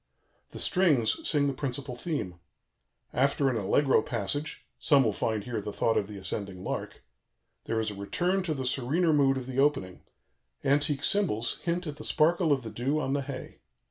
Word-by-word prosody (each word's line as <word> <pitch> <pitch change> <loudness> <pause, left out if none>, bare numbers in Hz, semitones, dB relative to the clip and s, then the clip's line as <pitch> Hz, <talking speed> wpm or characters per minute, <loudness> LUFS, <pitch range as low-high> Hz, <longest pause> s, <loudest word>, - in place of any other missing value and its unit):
The - - -10
strings 155 - +2
sing 145 -3 +3
the 140 - 0
principal 130 -1 -4
theme. 120 - -4 0.7
After 140 +1 +2
an 130 - -1
allegro 115 +5 +3
passage 145 +6 -3
(some 140 -4 +5
will 110 -4 +1
find 110 0 -1
here 115 -2 -3
the 105 - -5
thought 115 +2 +1
of 100 - +1
the 105 -1 -8
ascending 95 -1 -5
lark), - - -5 0.6
there 115 - 0
is 110 -1 -1
a - - -8
return 180 - 0
to 160 -3 -1
the 130 -2 -3
serener 145 +7 +1
mood 135 -2 +4
of 130 - -4
the 130 +1 -3
opening; 135 -11 +1 0.6
antique 145 +1 +1
cymbals 115 - +1
hint 175 +1 -1
at 150 -2 -5
the 150 - -8
sparkle 165 +1 +3
of 135 -3 +2
the 110 - -6
dew 135 +7 0
on 135 -3 -1
the 140 - +1
hay. 135 -1 -7
135 Hz, 185 wpm, -29 LUFS, 115-150 Hz, 0.7 s, some